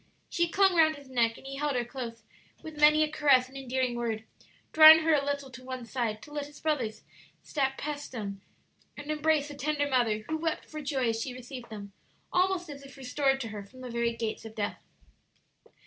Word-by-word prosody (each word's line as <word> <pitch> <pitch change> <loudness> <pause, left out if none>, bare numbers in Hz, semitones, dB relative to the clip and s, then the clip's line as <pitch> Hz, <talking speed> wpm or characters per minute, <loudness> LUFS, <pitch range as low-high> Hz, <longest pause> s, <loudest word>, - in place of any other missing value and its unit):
She 340 0 +1
clung 385 0 +4
round 315 -1 +5
his 280 -2 -14
neck, 230 -2 +2
and - - -15
he 275 0 -6
held 290 -1 -1
her 240 -1 0
close, 235 -3 -7 0.4
with 315 -1 -9
many 305 +1 +7
a - - +1
caress 275 -5 +4
and 265 - -17
endearing 260 -2 -1
word, 230 -2 -2 0.5
drawing 315 +1 +10
her 325 0 +3
a 285 -2 +3
little 280 -1 -3
to 255 0 -11
one 255 -1 -6
side 230 -3 -3
to 295 - -13
let 290 -1 -3
his 295 0 -14
brothers 255 -9 -2 0.4
step 270 -3 -1
past 290 0 -5
them 200 -5 -5 0.6
and 290 +1 -5
embrace 305 -1 +1
the - - -7
tender 290 +1 -1
mother, 230 -5 +1
who 315 - -1
wept 325 0 -2
for 305 -1 -7
joy 270 -4 0
as 225 0 -1
she 250 +1 -4
received 250 -1 -9
them, 200 -2 -9 0.4
almost 365 -1 +2
as 285 -2 -9
if 275 -1 -13
restored 270 +1 0
to 230 - -4
her 205 -1 -6
from 255 +6 -15
the 250 -1 -7
very 235 0 0
gates 225 -2 -3
of 220 -1 -10
death. 205 -2 -3
270 Hz, 210 wpm, -29 LUFS, 235-300 Hz, 0.6 s, drawing